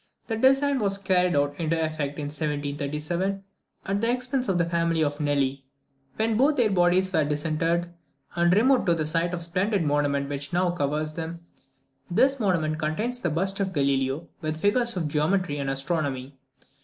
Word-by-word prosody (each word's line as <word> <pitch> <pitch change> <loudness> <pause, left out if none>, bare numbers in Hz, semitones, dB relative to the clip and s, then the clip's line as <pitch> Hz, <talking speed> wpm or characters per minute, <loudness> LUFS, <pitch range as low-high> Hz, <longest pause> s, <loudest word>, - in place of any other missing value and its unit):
This 225 -1 -3
design 270 +1 +4
was 200 -3 0
not 200 - -21
carried 180 -3 +3
into 145 +3 0
effect 155 -3 -2
till 150 - -5
1737, 150 +5 -2 0.4
at 200 +1 -1
the 230 - +2
expense 250 -1 -1
of 185 - +2
the 170 - +2
family 170 -1 +1
of 145 0 -2
Nelli, 140 -2 0 0.5
when 220 0 +1
both 285 +4 +3
their 230 -4 +3
bodies 185 +1 +2
were 160 - +3
disinterred, 160 +3 0 0.5
and 170 0 +3
removed 245 +6 +3
to 170 - +4
the 155 -2 -1
site 165 +2 0
of 180 -1 -4
the - - -2
splendid 185 +3 0
monument 145 -1 +1
which 140 +1 -5
now 180 0 +2
covers 155 -1 -2
them. 165 +1 -5 0.7
This 270 +9 +3
monument 160 -7 0
contains 210 +11 -1
the 175 - -1
bust 190 +5 -1
of 190 -1 -1
Galileo, 140 +1 0
with 155 -1 -3
figures 235 +3 +1
of 165 -4 -1
Geometry 150 +1 0
and 140 -1 -2
Astronomy. 135 -1 -2
170 Hz, 175 wpm, -26 LUFS, 150-195 Hz, 0.7 s, design